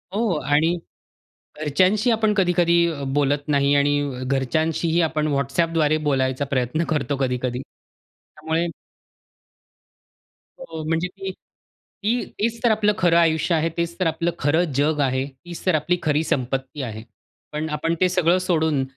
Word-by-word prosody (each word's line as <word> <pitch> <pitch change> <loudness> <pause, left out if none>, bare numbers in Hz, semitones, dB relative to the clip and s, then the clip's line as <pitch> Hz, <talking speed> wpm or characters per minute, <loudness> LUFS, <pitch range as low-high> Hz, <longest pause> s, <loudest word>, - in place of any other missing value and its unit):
हो 215 -6 +1 0.2
आणि 165 +4 +3 0.9
घरच्यांशी 190 - +2
आपण 220 -2 +2
कधी-कधी 175 -3 +3 0.4
बोलत 145 0 +1
नाही 140 0 +3
आणि 140 -2 0
घरच्यांशीही 155 +6 0
आपण 155 -1 0
WhatsAppद्वारे 155 +2 +1
बोलायचा 130 0 +1
प्रयत्न 130 +6 0
करतो 145 -2 0
कधी-कधी. 125 -1 -1
त्यामुळे 160 +4 -6 1.9
हो, 160 -1 -7
म्हणजे, 165 +3 0
की 195 +1 -7 0.7
ती 235 +3 +1 0.2
तेच 230 +2 0
तर 235 - +4
आपलं 210 -1 +2
खरं 175 -2 +3
आयुष्य 165 0 +2
आहे, 165 +1 +1
तेच 170 +1 -2
तर 180 - +2
आपलं 165 +2 0
खरं 155 +5 +2
जग 150 +1 +1
आहे, 130 0 +1 0.2
तीच 175 +1 -9
तर 185 -4 +3
आपली 175 +4 +1
खरी 150 +1 +1
संपत्ती 135 +1 -2
आहे. 110 -3 -6 0.5
पण 155 +1 -3
आपण 165 +2 -1
ते 185 - +4
सगळं 180 0 +3
सोडून. 160 -5 +2
160 Hz, 135 wpm, -22 LUFS, 140-175 Hz, 1.9 s, तर